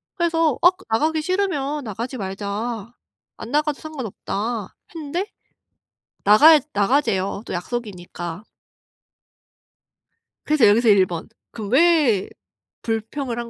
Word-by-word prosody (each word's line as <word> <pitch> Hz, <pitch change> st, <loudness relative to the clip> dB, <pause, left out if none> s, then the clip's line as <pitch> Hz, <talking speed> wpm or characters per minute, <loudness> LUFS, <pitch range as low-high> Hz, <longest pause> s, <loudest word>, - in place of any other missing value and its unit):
그래서 330 Hz, -4 st, +1 dB
"어 350 Hz, -, +8 dB, 0.2 s
나가기 310 Hz, +8 st, +1 dB
싫으면 300 Hz, -6 st, -1 dB
나가지 230 Hz, +4 st, -5 dB
말자. 205 Hz, +3 st, -5 dB, 0.4 s
안 225 Hz, -, -8 dB
나가도 300 Hz, 0 st, 0 dB
상관 310 Hz, -6 st, -7 dB
없다." 210 Hz, +1 st, -4 dB, 0.2 s
했는데 330 Hz, +4 st, -3 dB, 1.0 s
나가야 295 Hz, +10 st, +7 dB
"나가재요. 200 Hz, -3 st, 0 dB
또 -, -, -6 dB
약속이니까." 180 Hz, -3 st, -6 dB, 2.0 s
그래서 295 Hz, -7 st, +4 dB
여기서 225 Hz, +3 st, +4 dB
1 195 Hz, -2 st, +6 dB
번. 170 Hz, -2 st, -6 dB, 0.2 s
'그럼 215 Hz, -3 st, -7 dB
왜 290 Hz, -, +3 dB, 0.5 s
불평을 230 Hz, +3 st, -3 dB
한 235 Hz, -1 st, -5 dB
240 Hz, 235 characters per minute, -22 LUFS, 205-300 Hz, 2.0 s, 어